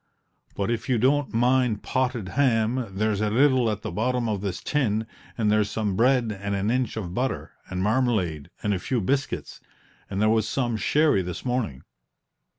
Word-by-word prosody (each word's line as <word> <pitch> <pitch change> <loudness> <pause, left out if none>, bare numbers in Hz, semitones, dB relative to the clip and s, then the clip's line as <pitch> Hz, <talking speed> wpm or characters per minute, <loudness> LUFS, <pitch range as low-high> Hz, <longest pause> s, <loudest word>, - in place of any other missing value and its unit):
"But, 100 +3 -1
if 120 +5 -3
you 125 - +3
don't 135 +4 +2
mind 120 -2 +2
potted 125 -6 -1
ham, 120 -2 +1
there's 105 +1 -1
a 105 - +1
little 130 0 +3
at 105 -1 -3
the - - -4
bottom 125 +2 0
of 105 -3 -1
this 100 -2 -3
tin, 115 -7 0 0.3
and 105 -3 +2
there's 105 -1 +2
some 105 -3 -1
bread 120 -1 +2
and 100 0 -2
an 100 +3 0
inch 125 -3 -1
of 90 -5 -4
butter, 130 +5 -2 0.2
and 90 0 -2
marmalade, 105 - 0
and 105 - +1
a 95 - -1
few 125 +6 -1
biscuits. 135 +7 -2 0.5
And 100 - -3
there 110 - +3
was 110 -1 +2
some 120 -4 0
sherry 145 0 +3
this 90 +4 -6
morning." 120 - -2
110 Hz, 180 wpm, -25 LUFS, 105-130 Hz, 0.5 s, you